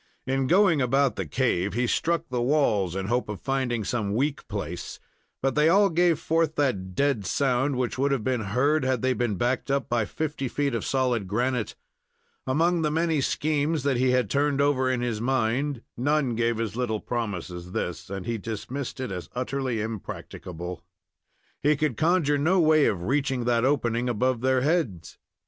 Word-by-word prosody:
In 135 0 0
going 180 -3 +4
about 135 -1 +2
the - - -4
cave, 105 -7 0
he 120 +3 +1
struck 165 +6 0
the 125 -1 -1
walls 115 - +2
in 95 0 -2
the - - -5
hope 120 -2 0
of 105 - -5
finding 130 -4 -1
some 105 -2 -2
weak 145 +4 -1
place, 90 -5 -5 0.4
but 135 - +2
they 150 +1 +4
all 200 +2 +5
gave 170 -1 +3
forth 160 -1 0
that 95 -11 -1
dead 140 -7 +1
sound 130 +6 +1
which 125 0 -2
would 140 +1 +2
have 135 -5 0
been 125 -1 0
heard 125 +9 +1
had 130 -2 0
they 130 0 +3
been 120 -3 -1
backed 120 +7 -1
up 140 0 0
by 120 -2 +1
fifty 150 -1 -3
feet 140 +1 -1
of 115 - -2
solid 125 -6 0
granite. 120 +3 -1 0.7
Among 165 +5 +2
the 155 - +1
many 160 -1 +1
schemes 150 +1 0
that 140 -3 +1
he 130 +1 +2
had 125 -3 +2
turned 140 +4 +1
over 140 -2 +2
in 125 -1 0
his 115 -3 -2
mind, 130 +1 0
none 140 0 +1
gave 115 0 0
as 110 -2 -3
little 120 -3 -1
promise 105 -8 -3
as 90 0 -8
this, 90 -2 -4
and 95 -1 -5
he 115 -1 -2
dismissed 120 +6 -5
it 130 -5 -3
as 90 -2 -6
utterly 130 -2 -2
impracticable. 90 -5 -6 0.8
He 150 +1 +3
could 150 -4 0
conjure 155 -1 +2
no 175 +6 +3
way 155 -2 +5
of 90 -4 -1
reaching 135 +2 0
that 120 0 +2
opening 125 -3 +1
above 120 +1 0
their 130 0 +2
heads. 135 - -1
130 Hz, 185 wpm, -26 LUFS, 115-145 Hz, 0.8 s, all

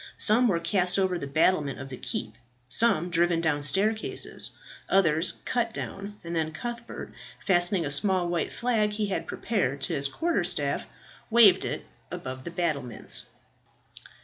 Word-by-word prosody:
Some 235 +3 +4
were 180 -6 +2
cast 180 +2 +1
over 185 -2 +1
the 140 - -5
battlement 150 0 +2
of 135 0 -7
the 130 - -6
keep, 110 -3 -3 0.3
some 175 - +2
driven 170 0 +2
down 155 -3 +1
staircases, 210 +9 +1 0.4
others 170 -3 +3
cut 235 -2 0
down, 200 +1 -5
and 170 0 -5
then 160 -1 0
Cuthbert, 235 +5 -6 0.3
fastening 175 -1 +2
a 145 - -2
small 185 +3 +1
white 170 -1 -1
flag 225 -4 +1
he 210 0 0
had - - -2
prepared 140 - -1
to 170 - -1
his 140 -2 0
quarter 335 - 0
staff, - - -1 0.4
waved 225 -4 +6
it - - -4 0.2
above 130 0 -6
the - - -4
battlements. 150 -9 -2
175 Hz, 150 wpm, -27 LUFS, 155-210 Hz, 0.4 s, waved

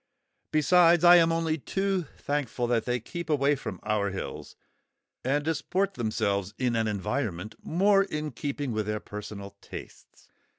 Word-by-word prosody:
Besides, 170 +2 +5
I 175 0 +9
am 165 -1 +4
only 165 -1 0
too 195 +1 -1
thankful 140 -4 -2
that 120 -2 +1
they 125 0 0
keep 170 +9 -7
away 145 -1 +3
from 100 -9 -6
our 105 -1 0
hills, 95 - -6 0.7
and 145 +3 0
disport 180 +5 0
themselves 100 -4 -1
in 125 -2 0
an 110 -1 +1
environment 105 -2 -2
more 195 +4 +3
in 150 -5 -4
keeping 140 +2 -3
with 110 -2 -2
their 105 0 -1
personal 100 -1 -8
tastes. - - -11
140 Hz, 145 wpm, -28 LUFS, 105-165 Hz, 0.7 s, I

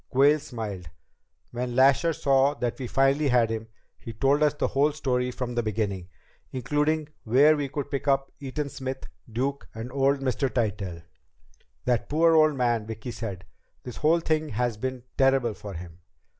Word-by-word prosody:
Quayle 145 +4 +4
smiled. 105 - -6 0.6
"When 125 0 -3
Lasher 135 +5 +5
saw 140 -1 +2
that 120 -2 -3
we 130 - -4
finally 135 +4 +2
had 120 -3 +3
him, 110 0 -4 0.3
he 115 - -8
told 135 +7 +2
us 150 -1 +3
the - - 0
whole 145 +3 +2
story 125 -4 0
from 125 -1 -4
the 120 - +1
beginning, 100 -4 -2 0.4
including 150 +4 0
where 140 +7 +5
we 145 -2 -2
could 140 0 -5
pick 140 0 -3
up 135 0 +2
Eaton 140 +2 -4
Smith, 130 -1 -5 0.3
Duke, 135 +5 -2
and 115 +3 -6
old 135 +1 +2
Mr. 135 +1 0
Tytell." 100 -8 -2 0.8
"That 120 -2 0
poor 165 +2 +4
old 155 -2 +5
man," 120 -4 0
Vicki 110 +2 -6
said. 100 -6 -6 0.4
"This 125 - -8
whole 165 +3 +3
thing 155 -1 0
has 120 0 -1
been 130 +3 -4 0.2
terrible 135 -4 +3
for 100 -2 -9
him." 85 0 -9
130 Hz, 170 wpm, -26 LUFS, 115-140 Hz, 0.8 s, Lasher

